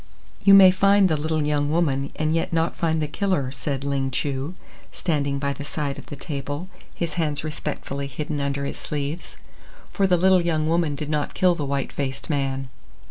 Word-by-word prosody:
"You 200 -1 +8
may 190 -2 +9
find 195 +1 +4
the 160 - +2
little 155 +1 -1
young 145 -1 +1
woman 140 -4 +1
and 155 0 0
yet 165 - 0
not 165 0 +1
find 160 -1 0
the - - -1
killer," 160 -5 -1
said 135 0 -3
Ling 140 -1 0
Chu, 140 +5 -2 0.4
standing 140 -5 -1
by 140 0 -1
the 145 - -7
side 145 -1 -3
of - - -13
the - - -7
table, 145 +4 -5 0.3
his 170 -3 -2
hands 150 -2 -1
respectfully 145 -2 -4
hidden 145 +2 -4
under 140 0 -1
his - - -4
sleeves. 150 +3 -4 0.6
"For 195 - +2
the 180 -1 +4
little 185 +1 +5
young 160 -2 0
woman 165 -3 +1
did 150 +1 -4
not 150 -1 -1
kill 180 -1 +4
the 155 -4 -3
white 140 -1 -2
faced 135 +2 -3
man." 135 -2 -1
150 Hz, 190 wpm, -24 LUFS, 140-165 Hz, 0.6 s, may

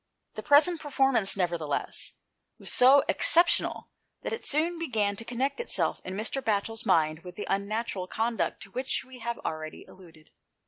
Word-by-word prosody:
The - - -6
present 310 +3 +4
performance, 270 -9 +2
nevertheless, 170 -5 -2 0.4
was - - -1
so 265 +3 +6
ex - - +4
ceptional 340 0 +2 0.3
that - - -3
it 455 - -5
soon 330 +3 +1
began 215 -10 -1
to 230 - -5
connect 255 - -2
itself 480 - 0
in 185 - -6
Mr. 225 +6 -2
Batchel's 225 +1 -2
mind 155 -1 +2
with 180 -1 -10
the 205 - -5
unnatural 200 -1 -2
conduct 225 +4 -2
to 195 - -15
which 255 +3 -3
we 260 -1 -13
have 235 0 -4
already 155 0 -5
alluded. 165 -4 -17
225 Hz, 165 wpm, -28 LUFS, 190-270 Hz, 0.4 s, so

